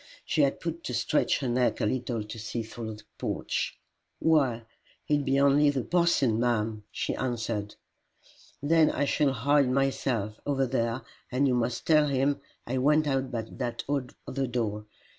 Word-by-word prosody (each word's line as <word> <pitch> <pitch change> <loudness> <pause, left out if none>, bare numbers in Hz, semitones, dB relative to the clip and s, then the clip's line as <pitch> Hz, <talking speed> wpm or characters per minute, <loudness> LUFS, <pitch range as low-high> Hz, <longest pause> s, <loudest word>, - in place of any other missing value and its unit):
She 155 - +1
had 140 -1 +2
but 170 0 -4
to 125 - -2
stretch 120 +5 +1
her 135 - -1
neck 125 +1 +1
a - - +1
little 120 -1 -1
to 105 +2 -8
see 115 +2 -3
through 110 0 -6
the 105 - -14 0.2
porch. - - -2 0.4
"Why, 135 -8 +2 0.4
it 145 -1 +2
be 135 0 +2
only 140 +1 +5
the 135 -3 0
parson, 170 -10 +2
ma'am!" 110 -3 0
she - - -2
answered. 115 -5 -3 0.9
"Then 160 +1 +5
I 145 - 0
shall 140 0 +2
hide 140 +2 +3
myself, 130 -5 0
over 135 -2 +1
there, 120 -1 -1 0.3
and 135 +3 +2
you 130 - +2
must 120 0 -1
tell 150 -2 +5
him 140 +1 +1 0.2
I 130 +2 -1
went 150 +3 +4
out 135 -2 0
by 115 -3 -3
that 120 +1 -4 0.4
other 135 0 -1
door. 105 -3 -2
130 Hz, 165 wpm, -28 LUFS, 115-140 Hz, 0.9 s, only